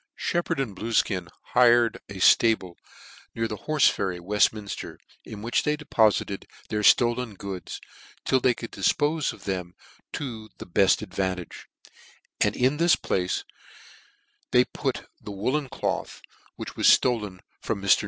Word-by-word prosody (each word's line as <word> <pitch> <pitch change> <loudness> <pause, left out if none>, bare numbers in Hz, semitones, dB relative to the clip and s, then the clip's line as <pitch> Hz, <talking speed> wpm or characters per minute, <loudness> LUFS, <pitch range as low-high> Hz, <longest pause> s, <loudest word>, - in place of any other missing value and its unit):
Sheppard 175 -5 -1
and 115 -8 -3
Bluefkin 100 -4 0 0.3
hired 120 -2 +5
a 100 - -8
flable 95 -1 +4 0.6
near 115 0 -1
the 110 - -4
Horfe 155 -2 +4
Ferry, 95 -2 -2
Weftminfter, 100 +2 -1 0.3
in 105 -1 -9
which 120 - +1
they 150 0 0
depo 115 -7 +3
fited 100 -1 -4 0.2
their 105 - -1
ftolen 120 -1 +3
goods, 95 -3 -6 0.5
till 130 - +3
they 125 -1 +2
could 115 - -8
difpofe 150 0 +1
of - - -14
them 90 -2 -4 0.4
to 115 -6 -6
the - - -8
belt 95 +3 +3
advantage; 95 -3 -4 0.7
and - - +2
in 130 +4 +2
this 170 +1 +4
place 90 -1 -1 1.1
they 125 0 +4
put - - -4
the - - -9
woollen 130 +8 -2
cloth 100 -8 -4 0.3
which - - -8
was - - +6
flolen 105 -7 -2 0.2
from 100 - -3
NIr. 100 - -4
110 Hz, 145 wpm, -26 LUFS, 95-125 Hz, 1.1 s, was